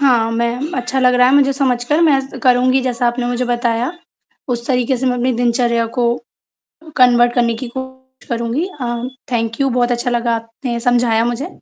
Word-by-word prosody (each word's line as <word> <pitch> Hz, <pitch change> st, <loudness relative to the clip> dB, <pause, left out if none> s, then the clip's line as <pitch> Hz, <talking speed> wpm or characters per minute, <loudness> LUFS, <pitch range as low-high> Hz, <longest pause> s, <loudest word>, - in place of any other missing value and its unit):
हाँ, 240 Hz, -5 st, +3 dB
मैं 235 Hz, +1 st, 0 dB
म 310 Hz, +5 st, -4 dB
अच्छा 250 Hz, +1 st, -2 dB
लग 250 Hz, -1 st, +4 dB
रहा 250 Hz, 0 st, +5 dB
है 265 Hz, -, +3 dB
मुझे 275 Hz, -1 st, +4 dB
समझ 260 Hz, -3 st, 0 dB
कर 300 Hz, +6 st, +1 dB
मैं 300 Hz, -5 st, +4 dB
स 270 Hz, 0 st, -10 dB
करुँगी 255 Hz, +1 st, +3 dB
जैसा 245 Hz, -1 st, -1 dB
आपने 240 Hz, +1 st, -1 dB
मुझे 245 Hz, +1 st, -1 dB
बताया 240 Hz, +2 st, -1 dB, 0.6 s
उस 235 Hz, -1 st, -3 dB
तरीके 250 Hz, 0 st, +1 dB
से 260 Hz, -, -2 dB
मैं 250 Hz, -, +2 dB
अपनी 250 Hz, +1 st, 0 dB
दिनचर्या 235 Hz, -1 st, +1 dB
को 245 Hz, -, +2 dB, 0.9 s
कन्वर्ट 240 Hz, -1 st, +5 dB
करने 235 Hz, -2 st, +1 dB
की 245 Hz, +2 st, -6 dB
कोशिश 260 Hz, 0 st, -10 dB
करुँगी। 235 Hz, +8 st, -1 dB
अ, 240 Hz, -1 st, -3 dB, 0.3 s
थैंक 230 Hz, 0 st, -2 dB
यू 275 Hz, -, +2 dB
बहुत 245 Hz, 0 st, +1 dB
अच्छा 240 Hz, +1 st, -1 dB
लगा 235 Hz, -1 st, 0 dB
आपने 230 Hz, +2 st, -5 dB
समझाया 235 Hz, -1 st, +2 dB
मुझे। 240 Hz, +6 st, -2 dB
245 Hz, 195 wpm, -17 LUFS, 235-260 Hz, 0.9 s, रहा